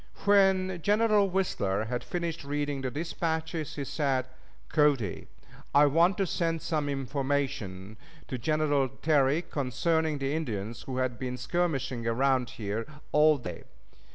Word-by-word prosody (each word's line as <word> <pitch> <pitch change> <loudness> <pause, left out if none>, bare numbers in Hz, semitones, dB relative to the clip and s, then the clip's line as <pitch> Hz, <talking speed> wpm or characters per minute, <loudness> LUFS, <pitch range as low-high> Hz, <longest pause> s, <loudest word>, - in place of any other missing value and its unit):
When 190 -3 +4
General 210 +1 +3
Whistler 110 - 0
had 125 +2 -3
finished 170 -3 -3
reading 145 -1 -2
the 130 - -2
dispatches, 160 +1 -3
he 145 - -3
said: 135 -2 0 0.4
"Cody, 145 - +1 0.5
I 145 +1 +8
want 165 +6 +4
to 195 - +1
send 165 -2 -1
some 150 -3 -1
information 135 -8 -2 0.3
to 130 - -4
General 145 0 +1
Terry 150 +1 +3
concerning 155 +3 0
the 135 0 -2
Indians 115 -8 -3
who 130 -1 -5
have 130 -2 -1
been 125 -1 -3
skirmishing 135 -8 -1
around 130 +1 +2
here 110 +1 -3 0.2
all 150 0 +5
day. 90 -10 -7
145 Hz, 130 wpm, -29 LUFS, 125-165 Hz, 0.5 s, I